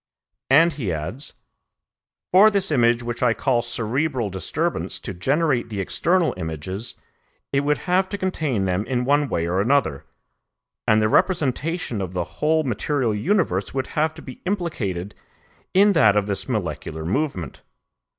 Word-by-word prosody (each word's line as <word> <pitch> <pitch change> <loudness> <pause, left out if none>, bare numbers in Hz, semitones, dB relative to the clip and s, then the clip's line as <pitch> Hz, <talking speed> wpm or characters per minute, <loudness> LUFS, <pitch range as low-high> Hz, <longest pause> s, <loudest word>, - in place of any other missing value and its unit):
And 165 +5 +6
he 120 -11 -3
adds, 85 - -5 1.0
"For 195 +4 +8
this 195 -4 0
image 120 -3 +3
which 120 0 -4
I 120 -2 +3
call 125 -4 +1
cerebral 120 0 -1
disturbance 95 -2 -2
to - - -6
generate 130 - 0
the 105 -3 -4
external 170 - +1
images, 80 +7 -5 0.6
it 140 - +3
would 145 +1 +1
have 185 +1 +2
to 200 - -3
contain 155 - -1
them 90 +2 0
in 125 -2 0
one 145 +1 +2
way 85 - -1
or 90 +3 +1
another, 115 - +1 0.8
and 110 0 +4
the - - +4
representation 155 - 0
of 95 -1 -4
the 90 -1 -1 0.2
whole 155 +1 +3
material 130 -2 0
universe 105 - 0
would 130 - -1
have 155 +1 +1
to 160 - -11
be 130 - -10
implicated 115 - -3 0.6
in 200 +2 +5
that 130 - +5
of 105 -1 +2
this 100 +5 -3
molecular 80 - -3
movement. 105 - -2
125 Hz, 150 wpm, -23 LUFS, 100-155 Hz, 1.0 s, For